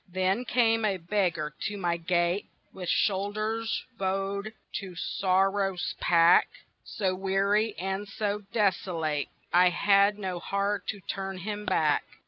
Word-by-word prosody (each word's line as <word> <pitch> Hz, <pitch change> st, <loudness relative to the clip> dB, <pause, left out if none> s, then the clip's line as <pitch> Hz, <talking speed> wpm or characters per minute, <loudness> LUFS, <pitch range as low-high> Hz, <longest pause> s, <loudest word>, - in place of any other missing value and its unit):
Then 185 Hz, +6 st, 0 dB
came 225 Hz, -3 st, +2 dB
a 200 Hz, -3 st, +1 dB
beggar 170 Hz, -4 st, -1 dB
to 205 Hz, -, -5 dB
my 175 Hz, -3 st, 0 dB
gate 175 Hz, +2 st, 0 dB, 0.2 s
With 180 Hz, -2 st, -6 dB
shoulders 215 Hz, +3 st, 0 dB
bowed 195 Hz, +2 st, -2 dB, 0.3 s
to 190 Hz, -3 st, -7 dB
sorrow's 195 Hz, +1 st, 0 dB
pack, 170 Hz, 0 st, +5 dB, 0.4 s
So 190 Hz, -3 st, -1 dB
weary 195 Hz, +3 st, +1 dB
and 190 Hz, +3 st, -3 dB
so 205 Hz, +1 st, -2 dB
desolate 175 Hz, -8 st, 0 dB, 0.3 s
I 180 Hz, +1 st, +6 dB
had 200 Hz, +2 st, +3 dB
no 185 Hz, -3 st, -4 dB
heart 200 Hz, +2 st, -1 dB
to 205 Hz, -2 st, -4 dB
turn 195 Hz, 0 st, -4 dB
him 210 Hz, +3 st, -5 dB
back. 155 Hz, -2 st, +2 dB
195 Hz, 125 wpm, -28 LUFS, 180-205 Hz, 0.4 s, I